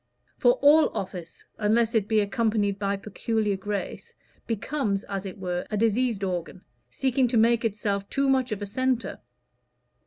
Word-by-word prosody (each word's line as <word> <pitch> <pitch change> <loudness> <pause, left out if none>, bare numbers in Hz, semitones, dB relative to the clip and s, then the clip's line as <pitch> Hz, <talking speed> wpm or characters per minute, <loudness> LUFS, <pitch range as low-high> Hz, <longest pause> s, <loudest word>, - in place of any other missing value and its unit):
For - - +4
all 300 +2 +6
office, 180 -3 -7
unless 220 +2 +2
it 215 -3 +1
be 220 -1 +3
accompanied 205 -1 0
by 200 0 0
peculiar 210 +1 -1
grace, 200 +1 -5 0.3
becomes, 220 -2 -1
as 195 -1 -5
it 190 - -8
were, 180 -2 -3
a 210 - -2
diseased 225 -1 +1
organ, 180 0 -4 0.3
seeking 265 -1 +1
to 235 0 0
make 230 +1 +4
itself 200 -2 -2
too 275 0 +1
much 260 -2 +2
of 210 -1 -3
a - - -2
centre. 255 +4 -1
215 Hz, 155 wpm, -26 LUFS, 200-235 Hz, 0.3 s, all